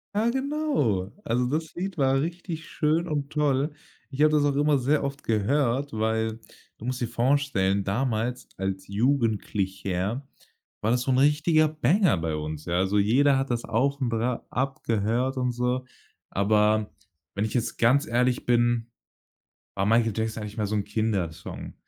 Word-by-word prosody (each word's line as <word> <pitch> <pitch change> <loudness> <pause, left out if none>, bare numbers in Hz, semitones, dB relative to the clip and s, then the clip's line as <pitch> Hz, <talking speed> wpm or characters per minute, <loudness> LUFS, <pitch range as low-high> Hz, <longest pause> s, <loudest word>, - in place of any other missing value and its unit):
Ja 220 +3 +2
genau. 265 - 0
Also, 125 +2 0
das 160 +3 -2
Lied 185 +1 -4
war 135 -1 +3
richtig 170 0 -5
schön 160 +3 +1
und 145 -2 -2
toll. 145 -1 +1 0.4
Ich 140 +2 -3
habe 155 - +6
das 150 -1 +3
auch 145 - +2
immer 145 0 +3
sehr 140 +4 +1
oft 140 0 -4
gehört, 130 +5 +1
weil 110 0 -1 0.4
du - - -10
musst 130 0 -3
dir 120 - 0
vorstellen, 120 -6 +1
damals 120 +3 -1
als 95 0 -3
Jugendlicher 105 -2 -1 0.5
war 110 - 0
das 125 0 +1
so 130 - -1
'n 130 - +2
richtiger 150 +3 +4
Banger 155 - +2
bei 80 -2 -2
uns, 75 0 -5
ja. 85 0 0
Also 95 +2 +1
jeder 135 +7 +4
hat 135 0 -1
das 120 -1 -1
auch 140 +5 +1
bra 120 -1 -1
abgehört 125 -1 -1
und 125 -1 0
so. 125 +1 -1 0.5
Aber 105 +1 +2 0.4
wenn 100 - -1
ich 110 - -3
jetzt 120 -2 -1
ganz 135 +6 +3
ehrlich 125 -1 +1
bin, 120 -1 +2 0.9
war 95 - 0
„Michael 115 +1 +3
Jackson“ 110 0 -2
eigentlich 105 0 -7
mehr 105 -2 0
so 110 - -1
'n 100 - 0
Kindersong. 100 -8 -3
125 Hz, 160 wpm, -26 LUFS, 110-145 Hz, 0.9 s, habe